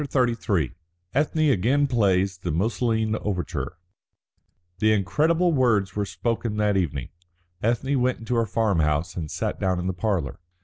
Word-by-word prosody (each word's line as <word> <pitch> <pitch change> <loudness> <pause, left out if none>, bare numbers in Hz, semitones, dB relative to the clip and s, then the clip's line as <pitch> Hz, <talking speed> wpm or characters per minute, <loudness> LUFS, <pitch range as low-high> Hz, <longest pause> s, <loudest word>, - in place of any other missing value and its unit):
CHAPTER 130 -4 +1
XXXIII 90 - -1 0.4
ETHNE 155 +1 +2
AGAIN 130 +7 +2
PLAYS 100 -7 +1
THE 90 - -4
MUSOLINE 110 +4 0
OVERTURE 90 -3 -3 1.0
The 110 0 +4
incredible 160 - +2
words 110 - +2
were 105 -1 -1
spoken 115 +3 -2
that 105 -1 +2
evening. 75 -9 -1 0.5
Ethne 125 +4 +1
went 125 0 +1
into 115 +2 -4
her 115 -1 +2
farm 105 -4 +1
house 75 +1 0
and 80 -4 -4
sat - - -3
down 95 -2 +1
in 90 - -3
the 95 - -1
parlour. 90 -8 -2
105 Hz, 150 wpm, -25 LUFS, 90-125 Hz, 1.0 s, The